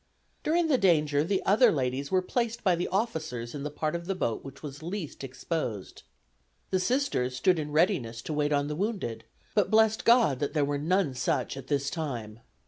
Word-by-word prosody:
During 335 Hz, +2 st, +2 dB
the 270 Hz, -5 st, +3 dB
danger 150 Hz, -6 st, +3 dB
the 190 Hz, +4 st, 0 dB
other 220 Hz, +4 st, +5 dB
ladies 135 Hz, -2 st, -1 dB
were 185 Hz, -1 st, +2 dB
placed 235 Hz, +3 st, -2 dB
by 185 Hz, -4 st, +4 dB
the 175 Hz, -, -2 dB
officers 160 Hz, -, -2 dB
in 145 Hz, -, -5 dB
the 150 Hz, -, -3 dB
part 155 Hz, +2 st, -2 dB
of 170 Hz, 0 st, -5 dB
the 195 Hz, -, -1 dB
boat 115 Hz, -10 st, -2 dB
which 135 Hz, +1 st, -11 dB
was 145 Hz, 0 st, -7 dB
least 170 Hz, -4 st, -5 dB
exposed. 130 Hz, -, -4 dB, 0.7 s
The 185 Hz, -, +2 dB
Sisters 185 Hz, -, 0 dB
stood 170 Hz, +7 st, +2 dB
in 150 Hz, -1 st, -4 dB
readiness 145 Hz, -, +1 dB
to 155 Hz, -, -4 dB
wait 150 Hz, 0 st, 0 dB
on 145 Hz, 0 st, +1 dB
the 150 Hz, -, -3 dB
wounded, 190 Hz, -, -3 dB, 0.3 s
but 205 Hz, -4 st, +2 dB
blessed 220 Hz, 0 st, +3 dB
God 230 Hz, -, +4 dB
that 145 Hz, -, -2 dB
there 145 Hz, -2 st, +3 dB
were 145 Hz, 0 st, -1 dB
none 165 Hz, -1 st, +1 dB
such 125 Hz, 0 st, -1 dB
this 140 Hz, +1 st, -2 dB
time. 120 Hz, -9 st, -5 dB
155 Hz, 195 wpm, -28 LUFS, 135-195 Hz, 0.7 s, other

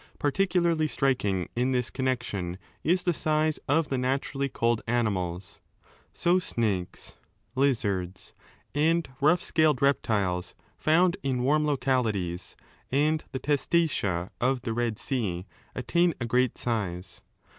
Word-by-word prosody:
Particularly 170 Hz, 0 st, +1 dB
striking 105 Hz, -, 0 dB
in 125 Hz, +2 st, +1 dB
this 125 Hz, -1 st, 0 dB
connection 120 Hz, -9 st, -2 dB, 0.3 s
is 180 Hz, +3 st, +2 dB
the 175 Hz, -, +2 dB
size 155 Hz, 0 st, +1 dB
of 150 Hz, 0 st, +2 dB
the 135 Hz, -, 0 dB
naturally 135 Hz, +2 st, -1 dB
cold 115 Hz, -2 st, +1 dB
animals. 95 Hz, -7 st, -1 dB, 0.5 s
So 175 Hz, +1 st, +2 dB
snakes, 105 Hz, -, -3 dB, 0.4 s
lizards, 100 Hz, -9 st, -1 dB, 0.4 s
and 160 Hz, +3 st, +2 dB
rough 165 Hz, +5 st, +4 dB
scaled 155 Hz, -5 st, +2 dB
reptiles 100 Hz, -10 st, +1 dB, 0.2 s
found 175 Hz, +4 st, +3 dB
in 130 Hz, -5 st, -1 dB
warm 150 Hz, +3 st, +3 dB
localities 115 Hz, -11 st, -1 dB, 0.4 s
and 150 Hz, +3 st, +2 dB
the 130 Hz, -, -3 dB
testacea 140 Hz, -, 0 dB
of 130 Hz, +1 st, +1 dB
the 115 Hz, -, -2 dB
Bed 115 Hz, -2 st, -1 dB
Sea 100 Hz, -11 st, -2 dB, 0.3 s
attain 170 Hz, +6 st, +1 dB
a 120 Hz, -, -2 dB
great 125 Hz, +1 st, +1 dB
size. 95 Hz, -7 st, -3 dB
130 Hz, 120 wpm, -27 LUFS, 105-155 Hz, 0.5 s, rough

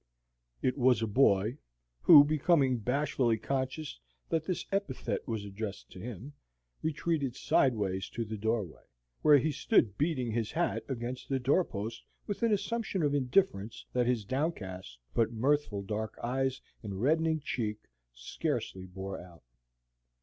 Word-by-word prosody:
It 130 Hz, +2 st, +1 dB
was 125 Hz, -2 st, +4 dB
a -, -, 0 dB
boy, 110 Hz, +1 st, +3 dB, 0.4 s
who, 145 Hz, -, +10 dB
becoming 145 Hz, -4 st, +2 dB
bashfully 125 Hz, -1 st, +1 dB
conscious 135 Hz, -, -3 dB, 0.3 s
that 160 Hz, -1 st, 0 dB
this 180 Hz, -1 st, -2 dB
epithet 195 Hz, -10 st, -2 dB
was 110 Hz, -4 st, -3 dB
addressed 100 Hz, 0 st, -6 dB
to 95 Hz, -, -10 dB
him, 120 Hz, +6 st, -7 dB, 0.5 s
retreated 155 Hz, -4 st, -1 dB
sideways 105 Hz, -10 st, +1 dB
to 115 Hz, -, -1 dB
the 110 Hz, +1 st, -5 dB
doorway, 110 Hz, -4 st, -2 dB, 0.4 s
where 150 Hz, -1 st, +7 dB
he 155 Hz, +4 st, +1 dB
stood 130 Hz, -, +2 dB
beating 140 Hz, -6 st, 0 dB
his 115 Hz, -1 st, -1 dB
hat 170 Hz, +1 st, 0 dB
against 125 Hz, 0 st, -4 dB
the 135 Hz, -, +1 dB
door 140 Hz, +8 st, +3 dB
post 115 Hz, -3 st, -6 dB, 0.2 s
with 205 Hz, -, -4 dB
an 230 Hz, -1 st, +3 dB
assumption 210 Hz, -3 st, -1 dB
of 145 Hz, -1 st, +2 dB
indifference 125 Hz, -, +1 dB
that 125 Hz, -1 st, +2 dB
his 120 Hz, -4 st, +1 dB
downcast 95 Hz, -, -3 dB, 0.2 s
but 115 Hz, 0 st, +2 dB
mirthful 120 Hz, -4 st, +1 dB
dark 110 Hz, +2 st, -4 dB
eyes 130 Hz, +2 st, 0 dB, 0.2 s
and 100 Hz, -4 st, -5 dB
reddening 160 Hz, +2 st, +2 dB
cheek 110 Hz, -7 st, -2 dB, 0.3 s
scarcely -, -, -3 dB
bore 95 Hz, +1 st, -6 dB
out. 85 Hz, -4 st, -14 dB
125 Hz, 140 wpm, -31 LUFS, 105-145 Hz, 0.5 s, who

